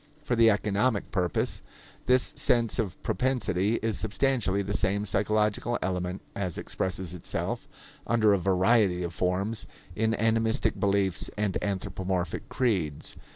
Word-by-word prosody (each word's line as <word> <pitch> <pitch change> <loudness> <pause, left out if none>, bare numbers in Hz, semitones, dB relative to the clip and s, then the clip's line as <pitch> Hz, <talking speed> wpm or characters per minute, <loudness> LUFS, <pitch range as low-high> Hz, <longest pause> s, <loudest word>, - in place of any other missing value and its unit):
For 120 - 0
the 115 -1 +6
economic 105 +2 +1
purpose, 90 -4 -1 0.5
this 125 0 +3
sense 120 -1 +2
of 100 -5 -2
propensity 115 -5 0
is 115 -1 0
substantially 110 -3 +1
the 100 +1 -3
same 100 +1 +1
psychological 105 +4 +1
element 90 0 -3
as 95 -4 -2
expresses 95 -2 -3
itself, 90 - -3 0.4
under 110 -3 +4
a 100 - +2
variety 95 0 +3
of 85 0 -4
forms, 95 +6 -1 0.3
in 110 +2 +1
animistic 115 +2 +1
beliefs 100 -2 +1
and 105 -3 0
anthropomorphic 95 -2 -2
creeds. 95 - -1
100 Hz, 125 wpm, -28 LUFS, 95-115 Hz, 0.5 s, the